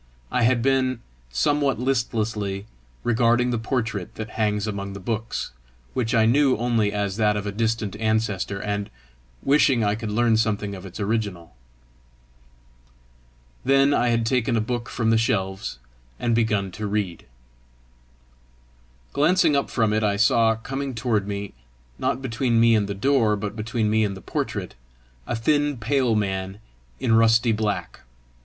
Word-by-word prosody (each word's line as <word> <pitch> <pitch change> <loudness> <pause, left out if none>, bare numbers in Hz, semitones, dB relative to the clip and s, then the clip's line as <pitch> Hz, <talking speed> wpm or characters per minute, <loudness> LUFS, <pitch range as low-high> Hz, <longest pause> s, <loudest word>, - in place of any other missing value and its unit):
I 125 - +1
had 120 0 +3
been, 130 -2 +2 0.3
somewhat 140 - +1
listlessly, 110 -6 -1 0.4
regarding 120 +1 +2
the 120 - -1
portrait 110 -5 -3
that 110 -1 -6
hangs 105 -2 0
among 100 -2 -4
the 100 - -7
books, 110 +3 -3 0.4
which 120 -2 0
I 110 -1 +4
knew 135 +3 +4
only 115 -3 +1
as 100 -1 -2
that 105 -1 +2
of 105 - -4
a 100 - -2
distant 110 -1 -1
ancestor, 110 -3 -1
and 105 0 -3 0.5
wishing 135 -4 +4
I 105 0 +2
could 110 0 -4
learn 115 +1 +2
something 105 -2 0
of 95 0 -8
its 95 - -10
original. 100 - -2 2.1
Then 135 +2 +4
I 120 - +2
had 115 -1 +1
taken 120 0 +1
a - - +3
book 120 +2 -3
from 115 -2 0
the 115 - +4
shelves 95 - -1 0.4
and 120 - 0
begun 110 -4 +1
to 105 +4 -5
read. 100 -4 -3 1.9
Glancing 160 +1 +3
up 140 - 0
from 110 -3 +1
it, 110 - +1
I 105 -2 +1
saw 115 +1 +4
coming 135 +3 -5
toward 110 -3 0
me 100 0 -4 0.5
not 135 - -1
between 120 -1 +1
me 115 0 +5
and 105 -2 +2
the 100 - -4
door, 115 -1 +2
but 105 +1 -5
between 110 0 -1
me 110 +1 +2
and 100 -2 -2
the - - -11
portrait - - -3 0.5
a - - -1
thin 145 +4 +1
pale 125 0 +1
man 95 -2 -2 0.4
in 115 - +1
rusty 115 +1 +4
black. 105 -1 -2
110 Hz, 155 wpm, -24 LUFS, 105-120 Hz, 2.1 s, me